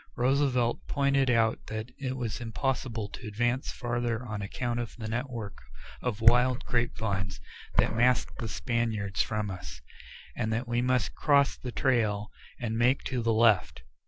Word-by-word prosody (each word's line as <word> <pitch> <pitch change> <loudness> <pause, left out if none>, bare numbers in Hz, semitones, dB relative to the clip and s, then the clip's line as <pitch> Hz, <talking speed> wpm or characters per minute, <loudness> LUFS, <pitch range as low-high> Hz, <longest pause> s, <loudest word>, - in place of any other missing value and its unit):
Roosevelt 125 -2 +1
pointed 140 -2 +2
out 115 -2 +2
that 110 +2 -5
it 130 -1 -3
was 120 -3 -3
impossible 115 -1 -2
to 120 - -8
advance 120 +5 0
farther 120 0 -2
on 105 -3 -4
account 120 +4 -2
of 120 -2 -5
the 110 -2 -5
network 115 -2 -4 0.4
of 115 -3 -2
wild 125 +3 +5
grape 120 -1 0
vines 95 -3 -2 0.4
that - - +3
masked 120 +1 +2
the 115 - -3
Spaniards 110 -4 -1
from 105 -2 -1
us, 90 -9 -8 0.6
and 110 - -1
that 115 +3 -1
we 120 0 +1
must 125 0 +1
cross 140 -2 +3
the 125 - -6
trail 110 -6 +1 0.3
and 115 -2 -2
make 125 +3 +3
to 125 -3 -2
the 115 0 +1
left. 110 - +3
120 Hz, 160 wpm, -29 LUFS, 110-125 Hz, 0.6 s, wild